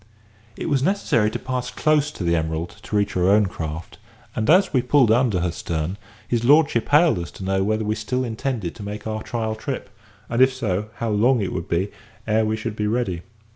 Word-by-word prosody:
It - - -4
was 140 -5 +1
necessary 140 - +2
to - - -3
pass 125 -1 -3
close 150 +3 +2
to - - -6
the 85 0 +2
Emerald 80 +1 -2
to 105 +1 -5
reach 100 -1 +1
our 90 0 +3
own 105 +1 +5
craft, 80 -3 -6 0.4
and 110 - -1
as 185 +2 +5
we 130 - +4
pulled 125 -2 +4
under 115 -6 +3
her 90 -1 0
stern, 80 +2 -3 0.5
Lord 145 +5 +5
hailed 145 - +3
us 85 -3 -5
to 95 - -10
know 95 0 +1
whether 110 +2 0
we 105 - +1
still 115 +4 -2
intended 115 -6 -3
to - - -12
make 105 +1 -6
our 110 0 -3
trial 110 -2 -2
trip, 110 - -5 0.4
and, 120 +2 0
if 130 0 +6
so, 105 -5 -2
how 115 - -2
long 120 +5 +3
it 100 - -2
would 85 - -4
be 90 +4 0 0.3
ere 110 +1 +2
we 110 0 0
should 110 0 -4
be 105 -1 -1
ready. 105 -7 -1
110 Hz, 215 wpm, -23 LUFS, 95-125 Hz, 0.5 s, if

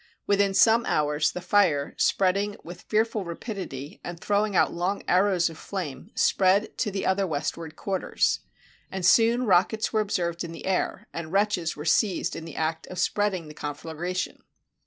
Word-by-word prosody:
Within 200 -1 +2
some 230 +3 +5
hours 150 0 +1
the 180 - -6
fire, 170 -7 +2
spreading 200 +2 +1
with 175 +2 -9
fearful 215 -1 0
ra 170 -2 -5
pidity, 165 - -7
and 175 -1 -6
throwing 205 +1 0
out - - +3
long 180 +4 -2
arrows 185 -1 +3
of 165 -2 -8
flame, 180 -2 -6
spread 195 +3 +3
to - - +1
the 195 -1 -3
other 190 +1 +1
westward 160 +1 -4
quarters. 195 -2 0 0.5
And 190 -2 -3
soon 230 +6 +5
rockets 210 +4 +2
were 215 - +3
observed 175 -5 -1
in 170 -1 -6
the - - -9
air, 190 -1 -1
and 160 -1 -6
wretches 195 -4 +1
were 150 - -7
seized 185 +3 +1
in 160 - -7
the 165 - -9
act 160 0 -2
of 185 - -8
spreading 185 -2 0
the 150 - -10
conflagration. 160 +5 -4
185 Hz, 170 wpm, -26 LUFS, 165-205 Hz, 0.5 s, some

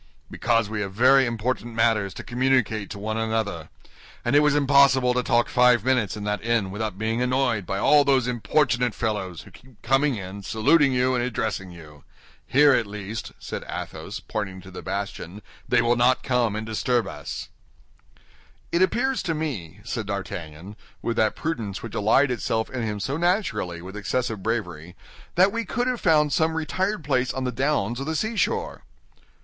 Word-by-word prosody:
"Because 115 -2 +1
we 105 0 -3
have 100 -1 -4
very 130 +4 +5
important 120 0 -3
matters 110 -4 +2
to - - -7
communicate 125 -4 0
to 100 - -7
one 110 +2 -3
another, 110 -7 -2 0.6
and 120 +4 +2
it - - +8
was 150 -1 +3
impossible 140 -3 +4
to 125 - +1
talk 120 -1 +2
five 125 -3 +4
minutes 125 -6 +1
in 105 - -6
that 105 +1 -2
inn 115 -5 0
without 105 -1 -4
being 110 +3 -1
annoyed 125 -6 0
by 95 - -2
all 145 +7 +5
those 135 -3 +3
importunate 125 -1 +1
fellows, 100 -7 -3
who - - -16
keep 125 -4 -19
coming 135 +3 +2
in, 95 0 -7
saluting 135 +9 +3
you, 130 0 +2
and 120 -1 0
addressing 110 -5 -2
you. 75 -4 -13 0.4
Here 145 +1 +5
at 115 -5 +1
least," 105 +1 -6
said - - -6
Athos, - - -6
pointing 95 -3 -4
to 95 +2 -13
the 90 - -8
bastion, 100 0 -5 0.3
"they 120 -1 +4
will 120 +1 +3
not 125 +2 +3
come 120 -5 +1
and 110 0 -4
disturb 115 0 0
us." - - -7 1.2
"It 170 - +1
appears 250 +7 +1
to 165 -3 -2
me," 105 - -5
said 115 -2 -4
D'Artagnan, 95 -2 -6 0.3
with 115 - -1
that 110 -1 +2
prudence 115 -12 -4
which 115 - -7
allied 125 +6 +3
itself 110 -1 -1
in 130 -2 -3
him 105 -2 -3
so 135 +8 -2
naturally 140 - -1
with 95 +2 -9
excessive 105 +1 -2
bravery, 90 -6 -3 0.4
"that 185 +3 +5
we 230 +1 -2
could 245 +4 -2
have 250 -2 -1
found 150 -4 +3
some 160 +3 +1
retired 185 +4 -1
place 130 -3 +1
on 130 - -4
the 125 - -1
downs 125 -2 0
or - - -3
the 160 +1 -2
seashore." 235 - -1
120 Hz, 180 wpm, -24 LUFS, 105-135 Hz, 1.2 s, it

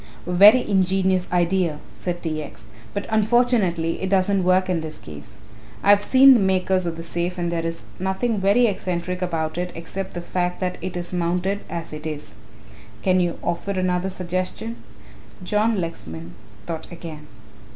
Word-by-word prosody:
"A 180 - -4
very 210 +7 +7
ingenious 190 -1 +2
idea," 175 -2 +1 0.2
said 175 -1 -4
T. 155 -2 -2
X., 140 -7 -10 0.3
"but 200 - -4
unfortunately 215 -7 +2
it 190 - -1
doesn't 195 0 +2
work 185 +1 +3
in 180 -3 0
this 155 -1 -7
case. 75 -1 -12 0.5
I 200 - +6
have 205 0 +6
seen 265 +4 +7
the 245 - +4
makers 190 -1 +1
of 165 -1 -3
the 165 - -6
safe 175 +2 -3
and 175 -1 -1
there 165 -1 -1
is 165 0 -4 0.2
nothing 190 +4 0
very 200 +6 +4
eccentric 180 -3 -2
about 165 -2 -2
it 180 0 -2
except 185 +3 -6
the 175 - -3
fact 180 0 -2
that 180 -1 -2
it 180 0 -4
is 175 +1 -6
mounted 180 +3 0
as 165 -2 -5
it 155 +1 -5
is. 150 -1 -6 0.7
Can 185 -1 +3
you 175 -1 0
offer 200 +3 -2
another 185 0 0
suggestion?" 185 +5 -3 0.7
John 210 +3 +1
Lexman 85 - -6 0.3
thought 165 0 -6
again. 160 -3 -9
180 Hz, 170 wpm, -23 LUFS, 170-190 Hz, 0.7 s, very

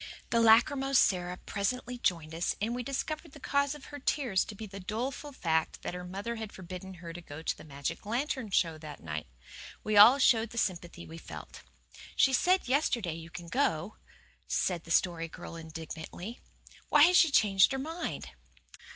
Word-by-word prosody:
The 230 - +4
lachrymose 265 +4 +5
Sara 180 -4 +2
presently 245 +6 -3
joined 165 -7 0
us 170 +2 -1
and 220 +3 -1
we 250 - -2
discovered 275 +3 -4
the 290 - -11
cause 280 +1 0
of 295 - -12
her 290 - -6
tears 255 -8 +1
to 210 - -8
be 220 - -7
the 195 -1 -9
doleful 245 +9 -4
fact 160 - -1
that - - -4
her 180 0 -6
mother 200 +6 -5
had 220 -2 -6
forbidden 185 +1 -8
her 170 -1 -9
to 175 - -8
go 160 -1 -9
to - - -1
the - - -13
magic 140 -2 -5
lantern 245 +1 -2
show 165 -4 +1
that 150 -2 -10
night. 75 -3 -5 0.6
We 215 -1 +1
all 230 +6 +10
showed 230 -4 +4
the 235 - -10
sympathy 175 -4 -2
we 165 +1 -10
felt. - - -10 0.5
"She 265 - +4
SAID 365 +5 +3
yesterday 245 - +1
you 165 0 -9
could 170 +1 -9
go," 210 - 0 0.5
said 175 -3 0
the - - -13
Story 165 -1 +1
Girl 165 - -9
indignantly. 165 - -8 0.5
"Why 295 - +7
has 360 +3 +6
she 330 - +6
changed 200 -6 +5
her 270 - -1
mind?" 325 +5 -4
200 Hz, 185 wpm, -30 LUFS, 170-260 Hz, 0.6 s, all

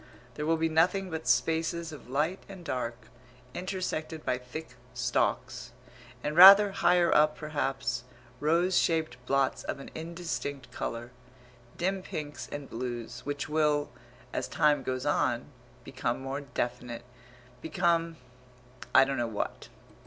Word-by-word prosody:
There 150 +5 -4
will 165 0 +3
be 165 0 +1
nothing 175 +4 +2
but 160 -4 -5
spaces 160 +6 +1
of 140 -5 -11
light 155 +8 0
and 190 -3 -10
dark, 120 -5 -2 0.6
intersected 180 -4 -4
by 125 - 0
thick 125 +5 -8 0.3
stalks, 125 0 -1 0.5
and 150 +1 -2
rather 195 +3 +10
higher 180 -3 +3
up 150 0 +4
perhaps, 135 -5 -2 0.4
rose 170 +5 +2
shaped 155 -7 0
blots 135 -1 +1
of - - -4
an 135 - -10
indistinct 165 -4 -5
colour 120 +1 -5 0.7
dim 190 +2 0
pinks 150 -4 -6
and 145 -1 -6
blues 120 -1 -5
which 145 0 -3
will, 150 -1 +1 0.4
as - - -2
time 150 -2 +3
goes 130 0 -3
on, 120 +4 0 0.3
become 125 -2 -2
more 135 +2 -4
definite, 125 -3 -4 0.6
become 165 0 +1 0.8
I - - +9
don't 135 0 -2
know 120 -1 0
what.... 110 -2 -4
150 Hz, 130 wpm, -29 LUFS, 125-165 Hz, 0.8 s, rather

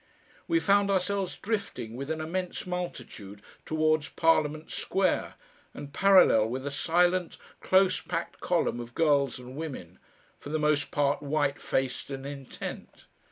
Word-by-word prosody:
We 335 - +3
found 200 -5 +3
ourselves 195 0 0
drifting 165 - -4
with 135 +3 -6
an 160 0 -2
immense 180 +3 -3
multitude 145 - -6 0.2
towards 155 0 +1
Parliament 155 -1 +1
Square 190 +1 0 0.4
and 145 -1 -8
parallel 185 - +6
with 130 +3 -4
a 140 - -2
silent, 175 +4 +1 0.2
close 190 0 +3
packed 170 +1 -4
column 170 -8 0
of 120 0 -8
girls 145 -5 +2
and 125 +1 -10
women, 135 - -7 0.4
for - - -9
the 155 - 0
most 150 -1 +1
part 145 -3 +1
white 145 -1 0
faced 130 0 -2
and 135 -1 -6
intent. 140 -2 -8
155 Hz, 140 wpm, -28 LUFS, 140-180 Hz, 0.4 s, parallel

